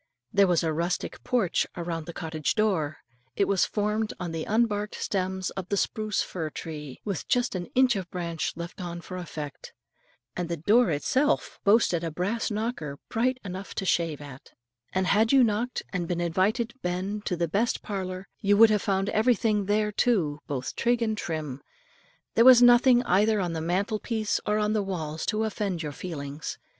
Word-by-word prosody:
There 200 Hz, -1 st, +5 dB
was 175 Hz, -2 st, +2 dB
a 160 Hz, -1 st, 0 dB
rustic 170 Hz, +4 st, -2 dB
porch 230 Hz, -9 st, +1 dB
around 170 Hz, -2 st, -4 dB
the -, -, -4 dB
cottage 160 Hz, -2 st, -2 dB
door; 185 Hz, -9 st, +1 dB, 0.4 s
it 200 Hz, -, +2 dB
was 200 Hz, -2 st, +3 dB
formed 210 Hz, +1 st, -1 dB
of 175 Hz, -2 st, -4 dB
the 165 Hz, -1 st, -3 dB
unbarked 210 Hz, -2 st, 0 dB
stems 190 Hz, -1 st, -2 dB
of 185 Hz, -2 st, -6 dB
the 200 Hz, -, 0 dB
spruce 215 Hz, 0 st, 0 dB
fir 160 Hz, -4 st, -4 dB
tree, 150 Hz, -4 st, -7 dB
with 200 Hz, -5 st, -3 dB
just 245 Hz, 0 st, +1 dB
an 180 Hz, -2 st, -4 dB
inch 255 Hz, -2 st, +5 dB
of 185 Hz, -3 st, -4 dB
branch 170 Hz, -3 st, -3 dB
left 170 Hz, +2 st, -7 dB
on 175 Hz, -1 st, -5 dB
for 185 Hz, -, -8 dB
effect, 155 Hz, -6 st, -7 dB, 0.6 s
and 175 Hz, -1 st, -3 dB
the 170 Hz, -, -2 dB
door 215 Hz, +9 st, +4 dB
itself 260 Hz, -, 0 dB
boasted 200 Hz, -5 st, +3 dB
of -, -, -1 dB
a 160 Hz, -, -6 dB
brass 205 Hz, +7 st, -1 dB
knocker, 210 Hz, -, -3 dB
bright 250 Hz, +3 st, +1 dB
enough 190 Hz, +1 st, -6 dB
to 195 Hz, -, -2 dB
shave 165 Hz, -5 st, 0 dB
at; 140 Hz, -2 st, -12 dB, 0.4 s
and 190 Hz, 0 st, 0 dB
had 215 Hz, +4 st, +3 dB
you 270 Hz, -2 st, +6 dB
knocked 230 Hz, +2 st, 0 dB
and 175 Hz, -3 st, -2 dB
been 175 Hz, 0 st, -2 dB
invited 200 Hz, +8 st, +1 dB
"ben" 185 Hz, +4 st, -2 dB
to 180 Hz, -, 0 dB
the 170 Hz, 0 st, 0 dB
best 205 Hz, +8 st, 0 dB
parlour, 190 Hz, -2 st, -4 dB
you 205 Hz, 0 st, +3 dB
would 225 Hz, 0 st, +8 dB
have 210 Hz, -2 st, +2 dB
found 195 Hz, 0 st, 0 dB
everything 215 Hz, -2 st, +2 dB
there 210 Hz, +1 st, +1 dB
too 180 Hz, -10 st, +1 dB
both 130 Hz, -3 st, -4 dB
trig 240 Hz, 0 st, +1 dB
and 220 Hz, -1 st, 0 dB
trim. 150 Hz, -5 st, -4 dB, 0.7 s
There 230 Hz, -, +5 dB
was 255 Hz, -1 st, +9 dB
nothing 245 Hz, 0 st, +6 dB
either 210 Hz, 0 st, +3 dB
on 175 Hz, -3 st, -1 dB
the 160 Hz, -, -3 dB
mantle 195 Hz, +6 st, 0 dB
piece 220 Hz, -2 st, -1 dB
or 210 Hz, 0 st, +2 dB
on 210 Hz, 0 st, +1 dB
the 215 Hz, -, +1 dB
walls 160 Hz, -5 st, -4 dB
to 215 Hz, 0 st, +1 dB
offend 200 Hz, -6 st, -2 dB
your 150 Hz, -, -3 dB
feelings. 145 Hz, -2 st, -6 dB
190 Hz, 190 wpm, -27 LUFS, 170-215 Hz, 0.7 s, was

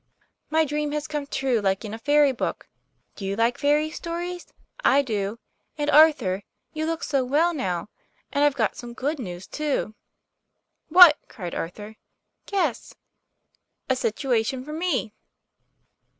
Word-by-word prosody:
' -, -, -41 dB
;< -, -, -52 dB
My 315 Hz, +1 st, +3 dB
dream 295 Hz, 0 st, -2 dB
has 300 Hz, 0 st, -2 dB
come 295 Hz, -2 st, -4 dB
true, 265 Hz, -4 st, 0 dB
like 195 Hz, +2 st, 0 dB
in 210 Hz, -, -6 dB
a 225 Hz, -, -6 dB
fairy 290 Hz, +3 st, +4 dB
book. 255 Hz, -, -4 dB, 0.5 s
Do -, -, -9 dB
you 195 Hz, +1 st, -2 dB
like 230 Hz, +2 st, +1 dB
fairy 300 Hz, +2 st, +2 dB
stories? 345 Hz, +2 st, -5 dB, 0.4 s
I 280 Hz, +1 st, +5 dB
do. 210 Hz, -3 st, -2 dB, 0.4 s
And, 295 Hz, 0 st, 0 dB
Arthur, 280 Hz, -11 st, +5 dB, 0.3 s
you 315 Hz, 0 st, -2 dB
look 330 Hz, 0 st, -2 dB
so 275 Hz, -2 st, +1 dB
well 305 Hz, +7 st, +2 dB
now. 185 Hz, -, -2 dB, 0.4 s
And 285 Hz, 0 st, +1 dB
I've 290 Hz, -2 st, +3 dB
got -, -, 0 dB
some 240 Hz, -1 st, -9 dB
good 290 Hz, +4 st, -2 dB
news, 180 Hz, -5 st, -6 dB
too. 295 Hz, -6 st, -2 dB, 0.5 s
" -, -, -54 dB, 0.3 s
"What?" 345 Hz, -2 st, +9 dB
cried 180 Hz, -8 st, -7 dB
Arthur. 210 Hz, +6 st, -6 dB, 0.5 s
"Guess." 350 Hz, -, -1 dB, 1.0 s
"A -, -, +3 dB
situation 250 Hz, +1 st, -1 dB
for 300 Hz, -, -7 dB
me." 320 Hz, -9 st, -1 dB
280 Hz, 155 wpm, -24 LUFS, 220-305 Hz, 1.0 s, What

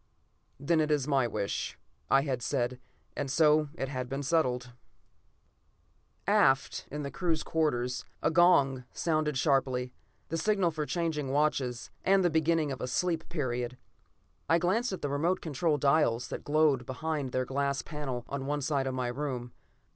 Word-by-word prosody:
"Then 155 Hz, +3 st, +2 dB
it 155 Hz, -, 0 dB
is 145 Hz, -3 st, +1 dB
my 135 Hz, -4 st, +2 dB
wish," 100 Hz, -3 st, -3 dB, 0.3 s
I 135 Hz, -, +5 dB
had 130 Hz, -4 st, -2 dB
said, 125 Hz, -1 st, -1 dB, 0.4 s
and 140 Hz, -1 st, -3 dB
so 150 Hz, 0 st, +4 dB
it 135 Hz, -, -3 dB
had 130 Hz, -2 st, -4 dB
been 135 Hz, +1 st, -3 dB
settled. 125 Hz, -5 st, 0 dB, 1.5 s
Aft, 150 Hz, -10 st, +2 dB
in 150 Hz, +1 st, -4 dB
the 140 Hz, -, -4 dB
crew's 165 Hz, -4 st, -1 dB
quarters, 125 Hz, -6 st, 0 dB, 0.2 s
a 160 Hz, -, +3 dB
gong 145 Hz, -7 st, +4 dB
sounded 155 Hz, -3 st, 0 dB
sharply: 130 Hz, -3 st, +1 dB, 0.4 s
the 165 Hz, -, -1 dB
signal 195 Hz, -4 st, +2 dB
for 155 Hz, -2 st, -3 dB
changing 160 Hz, -5 st, -1 dB
watches, 135 Hz, -4 st, 0 dB
and 195 Hz, 0 st, +4 dB
the 175 Hz, -, +3 dB
beginning 160 Hz, -1 st, +2 dB
of 130 Hz, -, -5 dB
a -, -, -2 dB
sleep 165 Hz, +4 st, -1 dB
period. 125 Hz, -5 st, -2 dB, 0.7 s
I 165 Hz, -, +5 dB
glanced 195 Hz, +9 st, +1 dB
at 190 Hz, -, -5 dB
the 145 Hz, -, 0 dB
remote 170 Hz, +6 st, +1 dB
control 155 Hz, 0 st, 0 dB
dials 140 Hz, -4 st, +2 dB
that -, -, -5 dB
glowed 145 Hz, -4 st, +2 dB
behind 145 Hz, 0 st, -3 dB
their 130 Hz, 0 st, 0 dB
glass 140 Hz, +1 st, -1 dB
panel 135 Hz, -6 st, -5 dB
on 135 Hz, -1 st, -4 dB
one 145 Hz, 0 st, -1 dB
side 140 Hz, -1 st, 0 dB
of 130 Hz, -, -2 dB
my 125 Hz, -1 st, -1 dB
room. 125 Hz, -2 st, -4 dB
145 Hz, 160 wpm, -30 LUFS, 130-160 Hz, 1.5 s, I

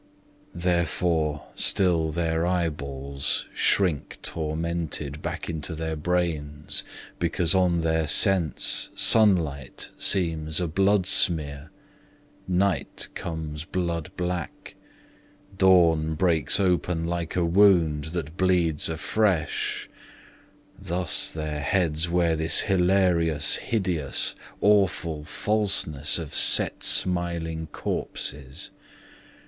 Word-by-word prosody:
Therefore 85 Hz, -3 st, -1 dB
still 85 Hz, -4 st, +2 dB
their 80 Hz, 0 st, -2 dB
eyeballs 70 Hz, -6 st, -2 dB
shrink 85 Hz, -8 st, 0 dB
tormented 80 Hz, -2 st, -3 dB
Back -, -, -6 dB
into 80 Hz, 0 st, -5 dB
their 80 Hz, 0 st, -4 dB
brains, 75 Hz, -3 st, -1 dB, 0.4 s
because 85 Hz, 0 st, +2 dB
on 90 Hz, -3 st, +1 dB
their 80 Hz, -1 st, -1 dB
sense 95 Hz, -1 st, +3 dB
Sunlight 85 Hz, -, +3 dB
seems 80 Hz, -4 st, +2 dB
a 90 Hz, -, -2 dB
bloodsmear; 85 Hz, -5 st, +2 dB, 0.8 s
night 95 Hz, +2 st, -1 dB
comes 80 Hz, -2 st, -6 dB
blood 85 Hz, -3 st, -4 dB
black; 90 Hz, -2 st, -5 dB, 0.8 s
Dawn 85 Hz, -5 st, +3 dB
breaks 80 Hz, -2 st, +2 dB
open 90 Hz, -3 st, -1 dB
like 85 Hz, -1 st, -4 dB
a 90 Hz, -2 st, 0 dB
wound 85 Hz, -5 st, +3 dB
that 80 Hz, 0 st, -6 dB
bleeds 90 Hz, -5 st, +1 dB
afresh 85 Hz, +1 st, -2 dB, 0.9 s
Thus 90 Hz, -1 st, 0 dB
their 75 Hz, -1 st, -5 dB
heads 80 Hz, 0 st, 0 dB
wear 85 Hz, -1 st, +1 dB
this 80 Hz, 0 st, +5 dB
hilarious, 90 Hz, -5 st, +2 dB
hideous, 90 Hz, -, 0 dB, 0.3 s
Awful 90 Hz, -6 st, +1 dB
falseness 95 Hz, -9 st, 0 dB
of 80 Hz, -4 st, -7 dB
set -, -, +5 dB
smiling 85 Hz, -3 st, +1 dB
corpses. 70 Hz, -2 st, -6 dB
85 Hz, 90 wpm, -24 LUFS, 80-90 Hz, 0.9 s, this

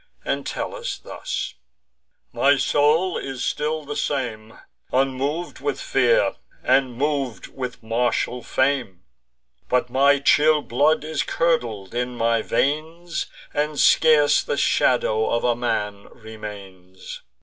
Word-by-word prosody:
Entellus, 140 Hz, 0 st, -3 dB
thus: -, -, -5 dB, 0.8 s
"My 140 Hz, +1 st, +4 dB
soul 150 Hz, +6 st, +2 dB
is 135 Hz, -2 st, -4 dB
still 155 Hz, 0 st, -2 dB
the 145 Hz, +1 st, -5 dB
same, 115 Hz, -6 st, -3 dB, 0.3 s
Unmov'd 135 Hz, +6 st, -1 dB
with 430 Hz, -, -2 dB
fear, -, -, +2 dB, 0.3 s
and 130 Hz, -3 st, +2 dB
mov'd 140 Hz, -4 st, -2 dB
with 125 Hz, -3 st, -6 dB
martial 120 Hz, +2 st, 0 dB
fame; 130 Hz, -9 st, -1 dB, 0.7 s
But 125 Hz, -1 st, +1 dB
my 140 Hz, +2 st, +4 dB
chill 150 Hz, +2 st, +4 dB
blood 145 Hz, +7 st, +2 dB
is 155 Hz, -1 st, -2 dB
curdled 120 Hz, -, -1 dB
in 125 Hz, +1 st, -2 dB
my 115 Hz, -1 st, +1 dB
veins, 160 Hz, +8 st, -2 dB, 0.3 s
And 150 Hz, 0 st, -1 dB
scarce 155 Hz, -2 st, +5 dB
the -, -, -2 dB
shadow 110 Hz, 0 st, +2 dB
of 115 Hz, -, 0 dB
a 120 Hz, -1 st, +2 dB
man 105 Hz, -4 st, -2 dB
remains. 100 Hz, -5 st, -10 dB
135 Hz, 115 wpm, -23 LUFS, 115-150 Hz, 0.8 s, scarce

